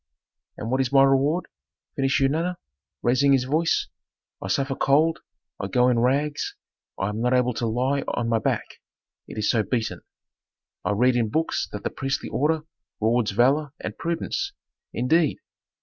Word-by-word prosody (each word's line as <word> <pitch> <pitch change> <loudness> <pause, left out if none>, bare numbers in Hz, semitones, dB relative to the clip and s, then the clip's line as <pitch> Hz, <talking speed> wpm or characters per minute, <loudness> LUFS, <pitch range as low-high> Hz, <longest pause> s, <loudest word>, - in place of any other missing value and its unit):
"And 115 - -4
what 130 +1 +2
is 130 -1 -1
my 135 -1 +6
reward?" 135 +6 +3 0.5
finished 135 -1 +1
Eunana, 160 +6 +1 0.5
raising 130 +3 +4
his 130 -2 +3
voice; 155 +6 +1 0.6
"I - - -4
suffer 135 0 0
cold, 155 +5 +3 0.4
I 100 - -2
go 125 +5 +3
in 120 -2 +2
rags, 145 +5 0 0.4
I 95 - -1
am 105 +2 -3
not 125 +1 +2
able 125 0 +2
to 115 +1 -2
lie 130 +5 0
on 120 - -1
my 115 -1 +2
back, - - -2 0.5
it - - -9
is 105 - +2
so 115 - +2
beaten. 115 +1 -2 0.8
I - - 0
read 125 +4 +3
in 115 -3 +1
books 160 +8 -1
that 105 - -6
the - - -2
priestly 135 0 -3
order 155 +2 +1 0.4
rewards 115 0 +2
valor 135 +7 +2
and 110 - -5
prudence. 280 - -2 0.4
Indeed! 150 +6 +2
130 Hz, 165 wpm, -24 LUFS, 120-145 Hz, 0.8 s, my